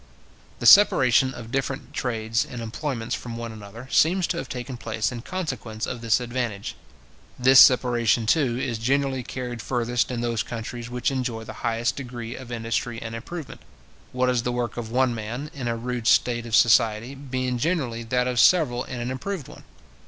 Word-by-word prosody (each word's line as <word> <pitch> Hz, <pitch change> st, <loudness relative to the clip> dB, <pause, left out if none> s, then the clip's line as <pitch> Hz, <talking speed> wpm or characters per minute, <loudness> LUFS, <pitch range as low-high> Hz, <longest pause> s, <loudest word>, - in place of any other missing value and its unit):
The -, -, -6 dB
separation 130 Hz, -, +6 dB
of 115 Hz, -1 st, -9 dB
different 135 Hz, 0 st, -3 dB
trades 115 Hz, -2 st, -1 dB
and 125 Hz, -, -8 dB
employments 115 Hz, +1 st, -4 dB
from 115 Hz, -2 st, -5 dB
one 115 Hz, -1 st, -5 dB
another, 110 Hz, +3 st, -10 dB
seems 180 Hz, +3 st, +3 dB
to 170 Hz, -, -2 dB
have 135 Hz, -, -5 dB
taken 125 Hz, +1 st, -5 dB
place 115 Hz, -1 st, -2 dB
in 120 Hz, -1 st, -6 dB
consequence 130 Hz, -11 st, -4 dB
of 120 Hz, -, -5 dB
this 115 Hz, 0 st, +2 dB
advantage. 120 Hz, -4 st, -3 dB, 0.6 s
This 130 Hz, +1 st, +6 dB
separation, 120 Hz, -3 st, +5 dB
too, 125 Hz, -1 st, +2 dB
is 120 Hz, -3 st, -2 dB
generally 135 Hz, +2 st, 0 dB
carried 125 Hz, -1 st, -6 dB
furthest 120 Hz, -1 st, 0 dB
in 120 Hz, -2 st, -3 dB
those 115 Hz, -2 st, -1 dB
countries 120 Hz, +1 st, -6 dB
which 125 Hz, +2 st, -1 dB
enjoy 125 Hz, -4 st, -3 dB
the -, -, -8 dB
highest 120 Hz, +1 st, 0 dB
degree 120 Hz, -3 st, -6 dB
of 130 Hz, -2 st, -10 dB
industry 115 Hz, 0 st, -2 dB
and 115 Hz, -1 st, -7 dB
improvement; 145 Hz, +7 st, -7 dB, 0.5 s
what 125 Hz, 0 st, 0 dB
is 125 Hz, -2 st, +2 dB
the 125 Hz, -, -2 dB
work 120 Hz, -1 st, -2 dB
of 115 Hz, -2 st, -5 dB
one 125 Hz, +1 st, +2 dB
man, 120 Hz, +7 st, -5 dB
in 130 Hz, -5 st, -5 dB
a 115 Hz, 0 st, -1 dB
rude 120 Hz, 0 st, -3 dB
state 120 Hz, +3 st, +3 dB
of 110 Hz, -, +1 dB
society, 115 Hz, +1 st, +4 dB
being 130 Hz, -2 st, -3 dB
generally 130 Hz, -7 st, -1 dB
that 125 Hz, +2 st, 0 dB
of 125 Hz, -1 st, 0 dB
several 125 Hz, -9 st, +4 dB
in 125 Hz, -, -6 dB
an 120 Hz, +2 st, -3 dB
improved 155 Hz, +4 st, -4 dB
one. -, -, -13 dB
120 Hz, 180 wpm, -24 LUFS, 115-130 Hz, 0.6 s, separation